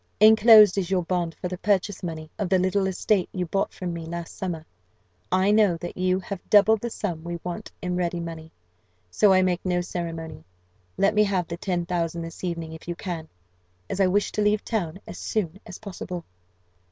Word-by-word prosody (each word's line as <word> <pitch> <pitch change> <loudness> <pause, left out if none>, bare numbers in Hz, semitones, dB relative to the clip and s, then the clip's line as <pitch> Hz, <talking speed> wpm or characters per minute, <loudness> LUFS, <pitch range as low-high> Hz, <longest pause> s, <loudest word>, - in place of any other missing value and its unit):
Enclosed 215 -2 +8
is 185 -2 -2
your 185 -2 +1
bond 170 -1 -1
for 180 - -4
the 180 0 -6
purchase 205 -1 0
money 160 -3 -6
of 200 -4 -1
the 190 - +4
little 190 +1 +1
estate 190 0 +1
you 180 -1 -2
bought 195 +4 -1
from 180 -2 -5
me 170 -1 -5
last 170 0 -6
summer. 170 -4 -4 0.7
I 185 +2 +3
know 210 -5 +4
that 175 +1 -7
you 185 0 +1
have 195 0 -6
double 210 +1 +6
the 235 +2 -4
sum 175 -8 -4
we 170 0 -4
want 180 +5 -5
in 180 0 -1
ready 175 -1 -1
money 165 -1 -7 0.6
so 200 - +4
I 185 0 +5
make 180 -1 0
no 180 -1 +1
ceremony. 165 - -5 0.5
Let 200 - +3
me 210 0 +5
have 190 -4 0
the 170 - -5
ten 175 -2 -2
thousand 170 -2 -2
this 165 +2 -9
evening, 170 -3 -3
if 160 - -11
you 175 - -3
can, 170 -3 -5 0.6
as - - -3
I 190 - +5
wish 200 +3 +1
to 210 - -1
leave 210 0 +2
town 190 -6 -2
as - - -9
soon 195 -4 -2
as 185 - -8
possible. 180 -4 -7
180 Hz, 200 wpm, -25 LUFS, 170-200 Hz, 0.7 s, Enclosed